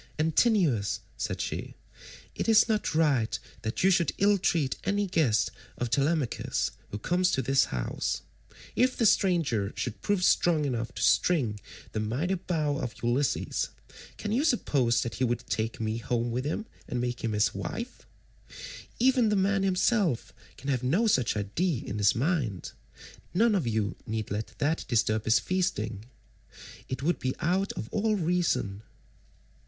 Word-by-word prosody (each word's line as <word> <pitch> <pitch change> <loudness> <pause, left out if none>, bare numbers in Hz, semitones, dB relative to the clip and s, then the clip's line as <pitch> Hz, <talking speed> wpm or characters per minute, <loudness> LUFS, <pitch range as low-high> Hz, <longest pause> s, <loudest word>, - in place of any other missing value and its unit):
"Antinous," 160 - +2
said - - -3
she, - - -4 0.6
"it - - -2
is 220 0 +6
not 215 -7 0
right 140 -8 +2 0.2
that 110 +8 -2
you 190 - +5
should 175 -2 +2
ill 200 0 +4
treat 155 -7 +1
any 200 +1 +1
guest 155 - +2 0.3
of 120 -2 -3
Telemachus 140 0 0 0.2
who 105 - -5
comes 180 - +1
to 135 - 0
this 135 0 +3
house. 60 -2 -3 0.5
If 255 +1 +2
the 230 - +2
stranger 160 - +2
should - - -4
prove 205 -3 0
strong 165 -4 +3
enough 120 -3 -2
to - - -2
string 125 -12 +2 0.3
the 110 - -2
mighty 125 - -1
bow 160 -6 -1
of 125 -6 -4
Ulysses, 120 -2 0 0.5
can 210 - -4
you 250 +6 +2
suppose 140 - +2
that 120 - -4
he - - +4
would 120 -1 0
take 110 +1 -2
me 110 0 -1
home 120 0 -1
with 125 +3 -2
him 160 +9 -2 0.2
and 125 - -2
make 120 -1 -3
me 115 -2 -1
his 105 0 +2
wife? 235 +2 -6 0.9
Even 250 -2 +4
the 210 - +2
man 195 0 +2
himself 190 - +1 0.2
can 140 - -6
have 130 -3 0
no 160 - +2
such 130 - +2
idea 125 - -1
in 105 +1 -4
his 100 -1 +4
mind: 125 - -1 0.6
none 225 +3 +4
of 180 -11 0
you 110 -2 0
need 110 -2 -3
let 105 +2 -4
that 155 +2 0
disturb 110 -2 +1
his 110 0 +5
feasting; 110 - -1 0.8
it 130 +1 -4
would 175 +4 +1
be 130 0 -2
out 185 +4 +1
of 110 - -5
all 215 +1 +1
reason." 170 - 0
145 Hz, 160 wpm, -28 LUFS, 115-185 Hz, 0.9 s, is